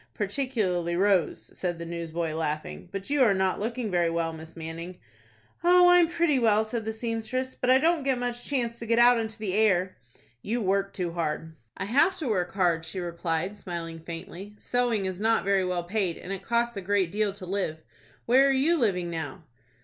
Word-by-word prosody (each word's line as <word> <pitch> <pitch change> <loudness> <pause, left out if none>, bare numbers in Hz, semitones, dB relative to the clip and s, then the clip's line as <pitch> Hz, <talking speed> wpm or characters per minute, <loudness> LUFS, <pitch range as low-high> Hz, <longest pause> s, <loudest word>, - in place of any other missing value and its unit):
"Particularly 200 -7 -1
Rose," 190 -3 +1
said 175 -2 -2
the 170 - -6
newsboy, 165 -1 -3
laughing. 155 +2 -4
"But 195 +6 -5
you 290 -1 +2
are 220 -6 +5
not 190 0 +1
looking 230 +1 -3
very 175 -2 +2
well, 165 -1 -1
Miss 160 0 -11
Manning." 165 +2 -7 0.7
"Oh, 355 +1 +7
I'm 355 -1 +6
pretty 335 -5 +2
well," 220 -2 +3
said 220 0 -4
the 220 - -1
seamstress; 230 +3 -3
"but 250 - -2
I 260 - +7
don't 325 +3 +2
get 270 -2 +1
much 245 0 -3
chance 235 -4 -1
to 230 - -6
get 230 +1 +2
out 240 0 +6
into 220 -1 -4
the 210 -4 -3
air." 190 -3 +2 0.4
"You 230 - -2
work 195 -1 0
too 180 -3 -3
hard." 160 -1 -3 0.2
"I 190 - -3
have 290 - +3
to 315 - -4
work 185 -6 0
hard," 175 -4 +2
she 165 +3 -6
replied, 170 +2 -2
smiling 165 -4 -6
faintly. 170 +5 -8
"Sewing 240 -5 0
is 185 -1 -3
not 225 +2 +2
very 195 -1 +2
well 180 -1 -1
paid, 185 -1 -1
and 190 - -6
it 195 - -5
costs 235 +3 0
a 200 - -4
great 190 -2 +1
deal 210 0 0
to 190 -2 -9
live. 185 -4 -2 0.5
Where 260 +4 +5
are - - +4
you 285 +6 +3
living 180 -7 0
now?" 160 -5 -5
200 Hz, 200 wpm, -27 LUFS, 175-235 Hz, 0.7 s, Oh